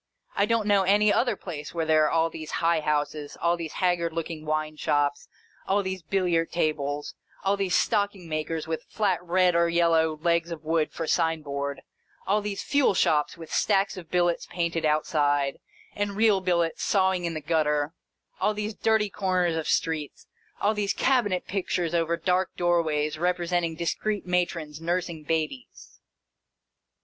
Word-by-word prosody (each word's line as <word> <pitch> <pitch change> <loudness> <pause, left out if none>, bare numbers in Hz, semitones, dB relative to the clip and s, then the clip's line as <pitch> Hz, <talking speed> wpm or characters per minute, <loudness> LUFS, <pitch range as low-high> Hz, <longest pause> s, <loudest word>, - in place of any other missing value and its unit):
I 200 - +2
don't 230 -1 +1
know 205 -1 +4
any 205 +2 +4
other 245 - +2
place 155 -3 -7
where 165 -1 0
there 155 -1 +4
are - - +2
all 165 0 +1
these 155 -1 -7
high 165 -1 +2
houses, 150 -1 -2
all 170 +1 +2
these 165 -2 -6
haggard 175 -3 0
looking 165 -1 -5
wine 155 0 -1
shops, 145 -1 0 0.4
all 200 +1 +2
these 190 -1 -4
billiard 170 -1 0
tables, 145 -3 -1 0.3
all 195 +1 +2
these 195 -3 0
stocking 200 -3 0
makers 155 0 -3
with 160 0 -2
flat 190 -5 0
red 180 +1 +3
or 170 0 +3
yellow 165 -2 +2
legs 170 0 +2
of 165 -2 -6
wood 160 0 0
for 165 - -4
sign 160 -1 +1
board, 140 -1 -4 0.4
all 205 +2 +2
these 205 -1 -4
fuel 285 -8 +2
shops 150 -3 +2
with 165 -1 -9
stacks 200 -1 +2
of 175 -4 -10
billets 175 -1 +1
painted 170 -2 -2
outside, 145 -2 +1 0.3
and 205 -1 -2
real 215 -3 +4
billets 170 -2 0
sawing 190 -3 +2
in 165 -1 -3
the - - -2
gutter, 150 -1 0 0.5
all 210 - +1
these 210 +1 -3
dirty 220 0 +2
corners 185 -4 0
of 160 -1 -3
streets, 155 -3 -1 0.3
all 210 - +2
these 205 -1 0
cabinet 235 -9 +1
pictures 180 -3 -2
over 170 0 +1
dark 185 +1 +1
doorways 155 -4 +1
representing 175 -1 0
discreet 200 +5 -2
matrons 170 -4 -1
nursing 170 -1 -2
babies. 160 - -4
170 Hz, 160 wpm, -26 LUFS, 155-190 Hz, 0.5 s, know